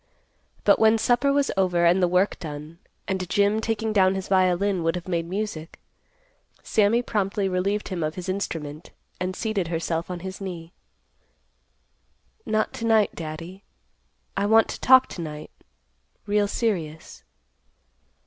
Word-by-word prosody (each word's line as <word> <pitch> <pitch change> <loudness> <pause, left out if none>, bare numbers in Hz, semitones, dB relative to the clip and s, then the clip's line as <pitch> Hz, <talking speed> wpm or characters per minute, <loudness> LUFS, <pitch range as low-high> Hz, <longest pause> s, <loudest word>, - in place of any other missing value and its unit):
But, - - +5
when 220 0 +5
supper 245 +5 +2
was 280 -1 +1
over 180 -3 +2
and 175 +2 +4
the 180 - +4
work 180 +3 +1
done, 150 +1 -8 0.3
and 190 -2 -2
Jim, 205 +3 +2
taking 220 -1 -1
down 190 -2 +4
his 190 -1 -5
violin, 185 0 +2
would 165 +1 0
have 175 0 -6
made 170 -2 -1
music, 180 -4 -5 0.8
Sammy 220 +3 +2
promptly 200 -3 -1
relieved 195 +3 -1
him 185 -3 -3
of 155 0 -2
his 180 0 -6
instrument, 165 -5 -4 0.3
and 185 0 -2
seated 210 -5 -2
herself 165 0 -2
on 180 -1 -5
his 190 +1 -7
knee. 175 -3 -7 1.7
"Not 215 0 0
to 230 - -5
night, 220 -2 +3
Daddy. 165 +4 -8 0.7
I 200 +1 0
want 220 +1 +5
to - - -5
talk 260 0 +7
to 175 - -7
night, 150 -2 -7 0.7
real 205 0 +2
serious." 170 -9 -3
190 Hz, 145 wpm, -24 LUFS, 170-210 Hz, 1.7 s, talk